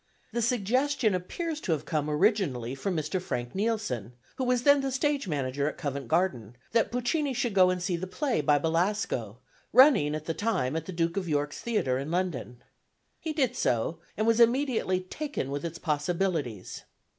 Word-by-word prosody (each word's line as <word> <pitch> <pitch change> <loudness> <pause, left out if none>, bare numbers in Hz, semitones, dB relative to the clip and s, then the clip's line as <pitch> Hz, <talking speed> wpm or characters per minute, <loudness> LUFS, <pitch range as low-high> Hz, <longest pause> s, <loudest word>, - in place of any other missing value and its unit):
The 235 - 0
suggestion 245 +1 +1
appears 305 - -3
to 170 - 0
have 155 -1 -3
come 150 -1 -1
originally 150 - +1
from 170 +6 -2
Mr. 155 +5 -1
Frank 120 -8 -4
Nielson, 195 - -2 0.2
who 260 - -1
was 250 -1 +1
then 285 0 +6
the 270 0 -2
stage 280 0 0
manager 140 -2 -1
at - - -9
Covent 140 -5 -4
Garden, 125 - 0 0.2
that 230 -1 +2
Puccini 260 +3 0
should 240 -3 0
go 185 -2 +6
and 185 0 0
see 180 -1 0
the 185 +2 -5
play 255 - 0
by 145 0 +4
Belasco, 160 - -1 0.3
running 250 - +6
at 155 0 -5
the 165 - -1
time 160 - -1
at 160 0 -3
the - - -4
Duke 170 +1 -1
of 185 -3 -2
York's 145 -1 -1
Theatre 135 - 0
in 140 +3 -4
London. 170 -8 -3 0.6
He 320 - -3
did 265 -5 0
so, 125 - 0 0.2
and 215 - +1
was 230 0 +3
immediately 235 -6 +3
taken 185 - -4
with 145 0 -3
its 170 0 -4
possibilities. 155 - -2
180 Hz, 180 wpm, -28 LUFS, 145-235 Hz, 0.6 s, then